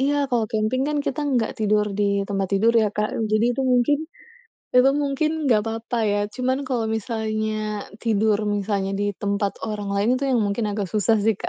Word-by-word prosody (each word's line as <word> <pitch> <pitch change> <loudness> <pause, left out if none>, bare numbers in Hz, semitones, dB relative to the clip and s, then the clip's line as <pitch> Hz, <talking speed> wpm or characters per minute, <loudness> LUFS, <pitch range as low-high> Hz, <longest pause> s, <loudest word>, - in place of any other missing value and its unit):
iya, 280 0 +1
kalau 235 -3 +1
camping 220 +4 0
kan 300 -1 0
kita 275 - -1
tidak 250 -6 +1
tidur 210 -1 +2
di - - +3 0.2
tempat 195 -1 -1
tidur 220 +4 +3
ya 220 -2 +4
Kak, 210 0 -1 0.2
jadi 215 +1 +3
itu 270 - 0
mungkin 250 +4 +3 0.8
emang 265 +3 +5
mungkin 285 +2 0 0.2
tidak 225 -5 +4
apa-apa 225 +1 -3
ya, 205 0 +1
cuma 255 0 0
kalau 245 -4 -1
misalnya 215 -1 -2 0.2
tidur, 215 -2 +2 0.2
misalnya 200 -1 -1
di 205 - +1 0.2
tempat 200 0 0
orang 210 -2 -4
lain 200 +2 +1
itu 280 - -2
yang 245 -3 +3
mungkin 205 +2 -1
agak 200 -3 -3
susah 215 +3 +2
sih 215 -1 +1
Kak. - - -4
220 Hz, 190 wpm, -23 LUFS, 205-250 Hz, 0.8 s, emang